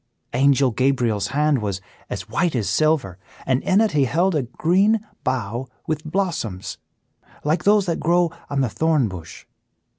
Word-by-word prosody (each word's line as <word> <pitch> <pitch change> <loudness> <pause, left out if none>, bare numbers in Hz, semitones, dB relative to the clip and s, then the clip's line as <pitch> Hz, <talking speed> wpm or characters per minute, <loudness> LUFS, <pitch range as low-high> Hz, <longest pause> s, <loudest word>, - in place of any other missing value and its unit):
Angel 135 0 +3
Gabriel's 120 -4 +1
hand 150 -2 +1
was 100 -3 -2 0.3
as - - -5
white 170 -4 0
as 110 -5 0
silver, 150 - +1 0.3
and 130 0 +1
in 190 - +3
it 220 - +2
he 145 -4 +3
held 170 +9 +1
a 150 - +1
green 185 - +2 0.2
bough 125 0 -2 0.2
with 155 -1 -2
blossoms, 155 - -3 0.6
like 155 +4 0
those 205 -1 +5
that 170 -3 -1
grow 170 +1 +2 0.2
on 140 -1 0
the 130 - +2
thorn 155 +1 +1
bush. 90 -5 -9
140 Hz, 155 wpm, -22 LUFS, 120-170 Hz, 0.6 s, those